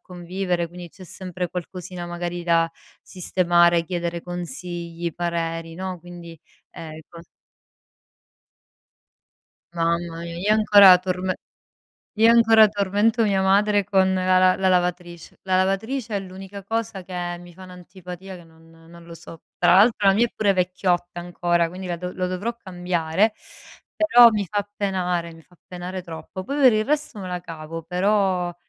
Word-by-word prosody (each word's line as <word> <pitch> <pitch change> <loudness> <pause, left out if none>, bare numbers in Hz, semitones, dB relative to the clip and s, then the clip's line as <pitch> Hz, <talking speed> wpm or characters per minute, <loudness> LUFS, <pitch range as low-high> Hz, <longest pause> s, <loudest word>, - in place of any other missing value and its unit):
convivere, 180 -1 -3
quindi 175 0 -10
c'è 185 +3 -14
sempre 180 0 -6
qualcosina 180 0 -7
magari 175 0 -5
da 165 -1 +2 0.3
sistemare, 175 -2 +2
chiedere 170 -1 -3
consigli, 175 -1 -6
pareri, 165 -1 -3
no. 185 -1 -5
Quindi 170 -1 -11 0.3
ehm, 155 -1 -9
cos 170 0 -13 2.5
Mamma 170 0 -1
mia, 170 0 -7
io 200 +5 +1
ancora 205 -3 +8
torme 185 0 -3 0.8
io 225 +2 +5
ancora 225 -2 +6
tormento 205 +3 +1
mia 200 -3 +1
madre 205 +1 +3
con 190 -1 +2
la 185 0 +2
la 185 0 +5
la 190 0 +1
lavatrice. 175 -2 -2
La 185 -1 +1
lavatrice 215 +5 -1
è - - 0
l'unica 195 +1 -10
cosa 225 -1 -3
che 175 -1 -5
mi 175 -1 -14
fa 190 - -14
un'antipatia 180 +1 -10
che 175 - -14
non 165 0 -21
non 165 +1 -17
lo 170 - -11
so. 165 0 -13 0.2
Tra 175 +1 +4
l'altro 205 -1 +4
la 195 - +5
mia 235 +4 +3
è - - -15
pure 205 -2 +2
vecchiotta 180 -1 -1
ancora, 175 -1 0
quindi 185 +1 -8
la 175 -1 -3
dov 180 +1 -6
lo 185 0 -2
dovrò 200 +6 -3
cambiare, 180 0 -1 0.6
però 245 -7 +7
mi 210 -2 -1
fa 205 0 -3
penare 180 -4 -2
mi 165 - -15
fa 180 - -25
penare 180 +1 -6
troppo. 170 +2 -8
Poi, 285 +7 -3
per 255 -3 +7
il 215 0 +1
resto 300 -5 -2
me 185 - -6
la 180 0 -4
cavo, 165 -1 -8
però 180 0 0
180 Hz, 155 wpm, -23 LUFS, 175-195 Hz, 2.5 s, ancora